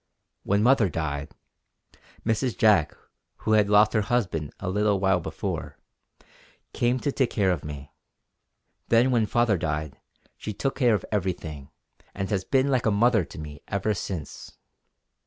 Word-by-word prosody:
When 100 +1 +1
mother 120 -5 +4
died, 75 -3 -4 0.9
Mrs. 115 +2 0
Jack, 105 -8 +3 0.4
who 110 - -3
had 105 -2 +4
lost 105 +1 +5
her 110 - +3
husband 100 -10 -1
a 95 - -5
little 105 +1 +1
while 95 -1 +2
before, 80 - -5 1.0
came 120 +1 +1
to 145 - 0
take 130 -3 +1
care 100 -4 +1
of 90 - -2
me. 75 -2 -8 1.0
Then 120 +3 +4
when 115 -3 +2
father 115 -5 +2
died 75 -3 -3 0.4
she 105 - -5
took 135 +5 -1
care 120 -5 +3
of - - -4
everything; 85 -8 -3 0.5
and 95 +2 -3
has 95 -2 0
been 135 +4 +1
like 125 -4 +1
a - - +5
mother 110 0 +3
to - - -13
me 75 -2 -8
ever 100 +2 0
since. 90 -6 -6
105 Hz, 155 wpm, -26 LUFS, 85-115 Hz, 1.0 s, lost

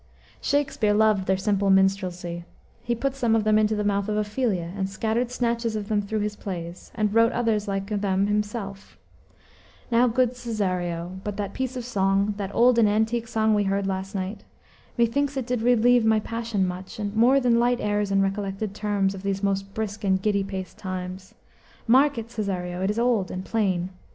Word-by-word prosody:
Shakspere 275 -7 +1
loved 215 -3 +3
their 190 0 +2
simple 200 0 +1
minstrelsy; 185 -3 +1 0.4
he 240 0 -1
put 270 +3 -1
some 240 -4 +1
of 220 - +2
them 215 0 +4
into 215 0 +2
the 210 - -1
mouth 200 0 0
of 210 - 0
Ophelia, 210 -5 -1
and 190 -1 -2
scattered 225 +4 -1
snatches 235 -2 -1
of 210 0 -4
them 210 -1 +2
through 210 +1 -2
his 210 0 -2
plays, 175 -4 -7
and 210 -2 0
wrote 230 +1 +5
others 225 -3 0
like 195 -1 -2 0.2
them 195 -1 +1
himself: 205 -1 -3 0.9
"Now, 240 +2 +4
good 250 +1 +2
Cesario, 185 -6 -3
but 205 -1 -4
that 200 -2 -3
piece 260 0 -3
of 245 - -5
song, 195 -2 +1
That 200 -2 -3
old 240 0 +5
and 215 -2 +5
antique 220 +2 0
song 220 -1 +2
we 205 -1 +2
heard 195 0 0
last 195 +1 -3
night, 195 +2 -4 0.5
Methinks 275 +4 +1
it 260 - -2
did 245 -1 -1
relieve 245 0 +4
my 220 -1 +4
passion 230 -3 -2
much, 180 +3 -7
More 225 +6 +3
than 240 -3 +3
light 245 +1 +2
airs 205 -1 0
and 195 0 +3
recollected 195 +1 -2
terms 205 -2 0
Of 190 - -8
these 195 0 -2
most 195 0 -1
brisk 215 0 -4
and 190 -1 +2
giddy 200 0 +1
paced 190 -1 -6
times. 185 0 -6 0.5
Mark 265 +4 +4
it, 230 0 -5
Cesario, 180 -5 -3
it 190 - +1
is 210 - -1
old 235 -6 +1
and 185 +1 -5
plain. 190 -5 0
210 Hz, 190 wpm, -25 LUFS, 195-230 Hz, 0.9 s, wrote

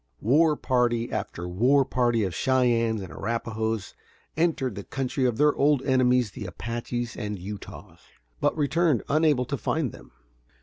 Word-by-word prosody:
War 150 +7 +4
party 120 -3 0
after 85 +1 -4
war 125 +10 +3
party 120 -3 +1
of 95 -3 -2
Cheyennes 115 0 +1
and 90 - -9
Arrapahoes 110 -1 -3 0.4
entered 150 -6 0
the 100 +1 -7
country 130 +2 -2
of 120 -3 0
their 150 +1 +4
old 140 -1 +2
enemies 125 -4 +2
the 105 -2 -7
Apaches 120 +5 -4
and 105 -1 -4
Utahs, 100 +3 -9 0.4
but - - +1
returned 155 -3 +2
unable 150 -4 +3
to 140 +3 -3
find 155 -5 -1
them. - - -14
125 Hz, 145 wpm, -26 LUFS, 110-140 Hz, 0.4 s, War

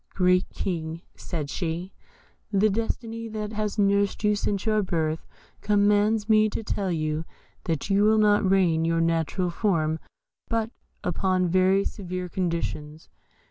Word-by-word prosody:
"Great 180 -1 +3
King," 165 -2 -4
said 155 -5 -5
she, 170 +4 -4 0.6
"the 205 +1 +3
destiny 230 +1 -3
that 215 -1 -5
has 210 0 -2
nursed 200 0 +2
you 210 0 +3
since 200 0 -2
your 215 -1 +2
birth 160 -4 -2 0.3
commands 205 +1 +2
me 215 -1 +4
to 225 - -4
tell 195 -3 -2
you 155 -1 -1 0.4
that 160 -4 -2
you 200 +1 +4
will 215 +1 +4
not 210 -1 +4
regain 185 -4 +3
your 165 0 +1
natural 165 +2 0
form 165 -5 0 0.5
but 230 -1 -1 0.3
upon 185 +1 +1
very 185 +2 +3
severe 185 -3 -4
conditions. 165 -4 -3
190 Hz, 140 wpm, -26 LUFS, 165-210 Hz, 0.6 s, me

